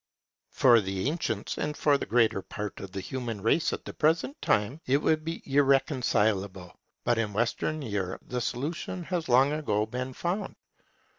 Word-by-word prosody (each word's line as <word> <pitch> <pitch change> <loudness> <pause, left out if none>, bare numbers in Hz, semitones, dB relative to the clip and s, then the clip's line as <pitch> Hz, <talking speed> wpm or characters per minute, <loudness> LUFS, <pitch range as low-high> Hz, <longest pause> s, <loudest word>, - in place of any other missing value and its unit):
For 120 -3 +5
the 95 +2 -2
ancients, 145 -9 -2
and 150 0 -2
for 145 -1 +3
the 140 - -2
greater 110 -2 +3
part 105 +1 -6
of 95 - -8
the 95 0 -4
human 120 +1 -4
race 115 - +2
at - - -5
the - - -7
present 165 - +1
time, 110 +10 +1
it 135 +2 +4
would 155 +1 +1
be 165 +1 -5
irreconcilable. 120 - +1 0.3
But 120 -1 +2
in 105 -3 -1
Western 120 +7 -1
Europe 100 -5 -3
the 125 0 -3
solution 155 +9 -3
has 170 -3 -3
long 130 +4 +5
ago 110 -9 0
been 125 +3 -4
found. 175 +9 -3
125 Hz, 165 wpm, -28 LUFS, 105-150 Hz, 0.3 s, For